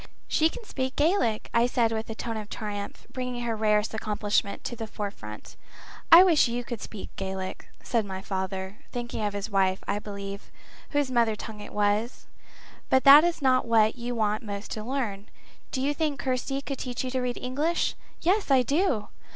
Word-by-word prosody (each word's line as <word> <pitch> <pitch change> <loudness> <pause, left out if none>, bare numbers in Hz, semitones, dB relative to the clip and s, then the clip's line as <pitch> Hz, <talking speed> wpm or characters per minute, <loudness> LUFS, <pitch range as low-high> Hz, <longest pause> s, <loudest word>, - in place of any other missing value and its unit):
"She 320 +1 +3
can 485 +7 -9
speak 260 -8 -3
Gaelic," 290 - +2
I 235 +1 +4
said 235 -2 +2
with 220 0 -3
a 225 - -4
tone 230 0 -4
of 215 -1 -6
triumph, 205 -2 -5
bringing 250 -1 -3
her 230 -1 -1
rarest 210 0 +2
accomplishment 210 -2 -1
to 240 - -4
the 225 -1 -5
forefront. 195 - -7 0.6
"I 340 +2 +11
wish 335 -8 +5
you 240 +1 -2
could 235 -3 -6
speak 210 - -8
Gaelic," 190 -1 -4 0.2
said 230 -3 +1
my 190 -2 -5
father, 190 +1 -4
thinking 240 -3 -4
of 205 -1 -1
his 205 +2 -4
wife, 190 -1 +2
I 205 - 0
believe, 200 -1 -7 0.4
whose 290 -3 0
mother 230 -3 +3
tongue 215 0 -8
it 205 - -9
was. 210 +4 0 0.6
"But 260 - +4
that 285 +2 +10
is 345 -4 0
not 255 -2 +3
what 220 -1 +4
you 245 0 -4
want 215 -1 +1
most 205 -2 -6
to 215 - -4
learn. 220 -5 -3 0.4
Do 260 - -3
you 290 +2 +1
think 300 -2 -1
Kirsty 265 +1 -1
could 275 -2 -4
teach 250 -1 -3
you 255 - -3
to 260 0 0
read 250 -1 -2
English?" 290 +7 0 0.3
"Yes, 385 +3 +2
I 265 -2 +5
do." 275 - +1
230 Hz, 190 wpm, -27 LUFS, 210-260 Hz, 0.6 s, I